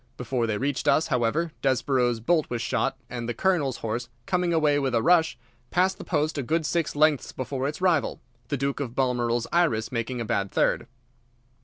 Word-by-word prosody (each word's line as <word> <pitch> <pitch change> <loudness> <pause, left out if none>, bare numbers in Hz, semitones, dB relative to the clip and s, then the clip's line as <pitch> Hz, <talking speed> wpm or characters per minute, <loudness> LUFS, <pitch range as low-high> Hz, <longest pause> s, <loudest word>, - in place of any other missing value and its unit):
Before 125 -1 -1
they 110 -2 -1
reached 140 +3 -2
us, 160 - +4
however, 135 +6 +1
Desborough's 130 -3 +1
bolt 155 +7 +1
was 120 - -2
shot, 135 +3 -1
and 120 -1 -5
the 120 - -2
Colonel's 150 -5 +1
horse, 115 +2 -3 0.2
coming 180 -1 0
away 150 -3 +3
with 135 -3 0
a 115 - +3
rush, 170 -2 +4 0.3
passed 185 +2 +1
the - - -6
post 155 -2 0
a - - +1
good 160 +5 0
six 165 -1 -1
lengths 150 -1 +3
before 130 +1 -3
its 150 +5 -5
rival, 175 -6 +2 0.3
the 145 - -1
Duke 140 +1 -1
of 125 -4 -4
Balmoral's 120 -3 +1
Iris 125 -11 +2
making 120 +1 -2
a 115 - -2
bad 100 -2 -1
third. - - +1
135 Hz, 190 wpm, -26 LUFS, 120-160 Hz, 0.3 s, us